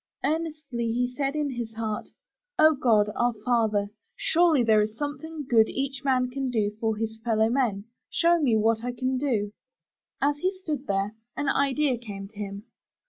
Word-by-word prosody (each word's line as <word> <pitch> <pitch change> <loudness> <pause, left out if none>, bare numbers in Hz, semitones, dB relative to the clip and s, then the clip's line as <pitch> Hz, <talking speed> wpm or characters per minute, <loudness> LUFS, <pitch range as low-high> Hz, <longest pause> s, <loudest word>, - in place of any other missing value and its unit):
Earnestly 300 -7 -2
he 245 +1 0
said 275 +1 -1
in 295 -2 0
his 235 -3 -5
heart: 220 -2 -3 0.5
*'0 310 0 +7
God, 210 -4 +4
our 240 0 +2
Father, 215 -4 +2 0.2
surely 325 -6 +3
there 220 -2 +5
is 215 +1 -2
something 295 +1 -5
good 225 -3 +5
each 275 +1 -3
man 255 -2 +2
can 270 0 -2
do 215 -4 +1
for 220 -1 0
his 220 0 -3
fellowmen. 225 -2 +1 0.2
Show 340 0 +3
me 240 -7 +3
what 225 +1 +2
I 245 0 -2
can 255 +1 -1
do.*' 220 -7 0 0.7
As 290 +1 +1
he 370 - +2
stood 300 -7 -4
there, 195 +1 0 0.2
an 290 -1 0
idea 275 -2 +2
came 200 -4 -7
to 220 - -28
him. 200 0 -6
245 Hz, 170 wpm, -26 LUFS, 220-285 Hz, 0.7 s, 0